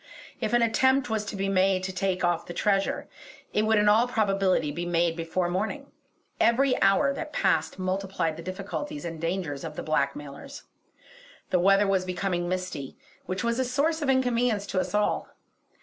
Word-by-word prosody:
If 220 -1 -2
an 240 0 +4
attempt 260 +2 +2
was 220 -1 0
to 210 - -5
be 195 0 -1
made 190 -1 +2
to 190 0 -3
take 185 0 -1
off 175 -1 0
the 175 - -7
treasure, 195 -1 0 0.5
it 215 +1 +2
would 220 0 +4
in 210 0 +3
all 220 +4 +5
probability 195 -8 +1
be 170 +4 -4
made 170 -1 +1
before 165 +2 -1
morning; 220 +11 -3 0.5
every 255 +3 +3
hour 275 +9 +4
that 305 +2 -6
passed - - +1
multiplied 185 -3 -2
the 165 - -8
difficulties 195 - -5
and 165 -2 -6
dangers 165 -5 -2
of 155 -2 -6
the - - -5
blackmailers. 155 - -3 0.9
The 180 - +3
weather 195 +3 +4
was 195 -2 +1
becoming 180 -1 -2
misty, 180 -7 -4 0.3
which 185 +5 -3
was 235 +1 0
a - - +3
source 290 +6 0
of 290 - 0
inconvenience 245 -5 +2
to 185 - 0
us 195 - -2
all. 210 0 +1
195 Hz, 180 wpm, -27 LUFS, 175-235 Hz, 0.9 s, all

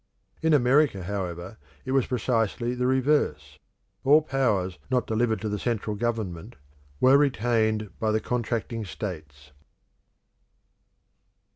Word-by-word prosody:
In 160 -1 +4
America, 130 -6 +3
however; 90 0 -5 0.3
it 130 - -3
was 135 -2 +2
precisely 120 -1 0
the 125 0 -1
reverse; 130 - 0 0.4
all 150 +3 +5
powers 105 - 0
not 125 -1 +1
delivered 110 -1 0
to 110 - -3
the 105 -1 -2
central 110 -2 -2
government 110 -3 -3 0.4
were 135 +2 +6
retained 110 -6 +1
by 110 -2 0
the 110 - +2
contracting 115 -1 -2
states. 75 -8 -7
115 Hz, 115 wpm, -26 LUFS, 100-125 Hz, 0.4 s, were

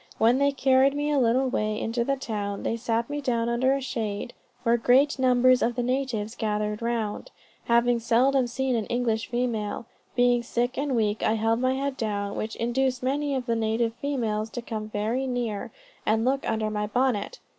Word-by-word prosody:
When 235 +4 +4
they 280 - +4
had 275 - -7
carried 265 +1 +4
me 295 +1 -1
a 290 - +3
little 255 +2 +3
way 215 -3 -1
into 235 +1 -1
the 275 +3 0
town, 205 -6 -4
they - - 0
set 230 0 -1
me 290 0 -4
down 235 -3 0
under 260 +3 +2
a 275 - -3
shade, 225 -3 -4 0.3
when 235 0 +3
great 265 +5 +3
numbers 255 0 +4
of 240 +1 +1
the 245 - -1
natives 245 -4 -1
gathered 210 -2 -2
round, 230 - -2 0.4
having 235 0 +3
seldom 250 +3 +3
seen 260 +1 -1
an 220 -3 -2
English 230 -4 -1
female. 235 -3 -2 0.3
Being 245 -1 +3
sick 240 +1 -1
and 280 -2 -1
weak, 215 -2 0
I 215 - +2
held 225 +1 +1
my 255 +1 +1
head 275 0 -2
down, 205 -2 -2
which 220 +1 -4
induced 250 +2 0
many 280 +2 0
of 255 -2 -2
the 230 -2 0
native 225 +1 0
females 225 -6 -2
to 245 - -5
come 215 -2 -5
very 225 +6 -1
near, 240 -5 -3 0.3
and 220 +2 +1
look 270 +1 0
under 220 -1 -1
my 210 0 -2
bonnet. 250 - 0
240 Hz, 195 wpm, -26 LUFS, 220-260 Hz, 0.4 s, When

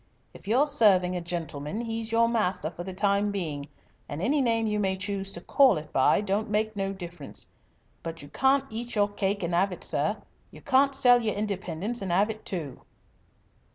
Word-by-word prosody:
If - - -14
you're 250 +7 +4
serving 195 -11 +4
a 180 - -2
gentleman 165 +1 -4
he's 225 -1 -4
your 230 0 +4
master 205 -8 0
for 175 +1 -7
the 190 - -6
time 200 +2 +1
being 155 -8 -4 0.4
and 145 - -5
any 275 - +1
name 230 -3 +1
you 210 -1 0
may 190 -2 +1
choose 195 0 -3
to 170 - -6
call 260 - +4
it 150 0 -8
by 130 +8 +4
don't 210 +2 -1
make 215 +1 0
no 195 -1 -2
difference. 175 -6 -7 0.5
But 165 -2 -7
you 145 - -11
can't 270 - +2
eat 235 +2 -5
your 205 -1 +3
cake 200 -1 -1
and 170 0 -2
'ave 185 +2 +2
it, - - -9
sir. - - 0 0.3
You - - -14
can't 275 0 +3
sell 245 -1 +5
your 215 -3 -1
independence 200 +1 -3
and 190 -3 -3
'ave 205 +5 +2
it, 215 - -19
too." 155 -9 -5
200 Hz, 195 wpm, -27 LUFS, 175-225 Hz, 0.5 s, sell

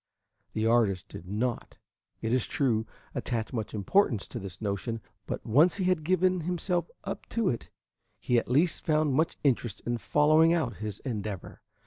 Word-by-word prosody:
The 110 - 0
artist 115 -6 +2
did 90 - -9
not, 115 +5 -2 0.5
it 115 +1 0
is 130 -3 +1
true, 115 -6 +1 0.3
attach 115 0 -2
much 110 -3 -3
importance 110 - +2
to 120 - -5
this 95 -4 -8
notion, 110 +2 -2 0.3
but - - -4
when 110 - -5
once 160 +7 +6
he 195 - -1
had 180 -3 +2
given 185 +2 +2
himself 175 0 -1
up 195 - -5
to 225 -4 +1
it, 120 - -3 0.5
he 120 -1 +2
at - - -7
least 160 +7 +2
found 155 -3 +2
much 160 +5 +1
interest 120 -6 +1
in 120 0 -1
following 155 +5 +4
out 150 -9 0
his 105 -2 -5
endeavor. 105 -6 -5
125 Hz, 170 wpm, -29 LUFS, 110-160 Hz, 0.5 s, once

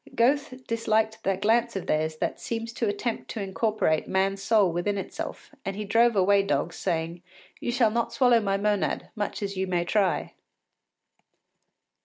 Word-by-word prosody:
Goethe 255 +1 +1
disliked 220 -1 0
that 195 -1 -1
glance 235 +2 +2
of 195 - -3
theirs 155 +1 0
that - - -2
seems 230 0 -4
to 230 - -1
attempt 215 +3 -3
to 225 - -5
incorporate 200 -4 0
man’s 195 +1 0
soul 210 -5 +3
within 175 +4 -1
itself, 195 - -6
and 195 - -3
he 210 +1 -4
drove 230 +3 +4
away 200 +1 +4
dogs, 170 -1 -1
saying, 170 -1 -2 0.4
“You - - -2
shall 235 -3 +3
not 235 +1 -1
swallow 235 0 +4
my 195 -2 0
monad, 205 0 0
much 210 -1 -3
as 200 0 -3
you 190 0 -1
may 175 -2 0
try. 195 0 +1
205 Hz, 165 wpm, -26 LUFS, 190-230 Hz, 0.4 s, drove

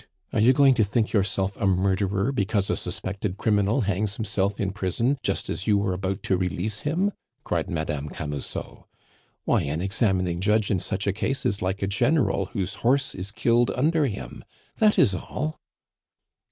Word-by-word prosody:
Are - - +1
you 115 +4 +6
going 135 0 +5
to 115 -3 +3
think 110 +2 0
yourself 100 -2 0
a 100 - 0
murderer 95 +3 +1
because 100 -4 0
a - - +1
suspected 100 0 -4
criminal 105 +3 +2
hangs 100 0 -1
himself 105 -2 -1
in 100 -1 0
prison 110 +8 0
just - - -1
as 95 - -4
you 105 -2 +4
were 100 -2 0
about 95 +2 -3
to 95 - +1
release 95 +3 -2
him?" 175 +7 0 0.3
cried - - -2
Madame 80 -4 -3
Camusot. 75 -2 -6 0.6
"Why, - - +3
an 75 +3 -2
examining 95 -2 +1
judge 105 +1 +2
in 95 - +2
such 95 +2 -2
a 100 - +1
case 130 +6 -2
is 100 +2 0
like 95 +2 -2
a - - +1
general 135 +9 +1
whose 100 -3 -3
horse 135 +3 +2
is 95 +2 -5
killed 120 +3 +2
under 150 +3 +2
him! 100 -5 -7 0.4
That 215 -1 +4
is 100 - +5
all." 155 +11 -4
100 Hz, 175 wpm, -25 LUFS, 95-115 Hz, 0.6 s, you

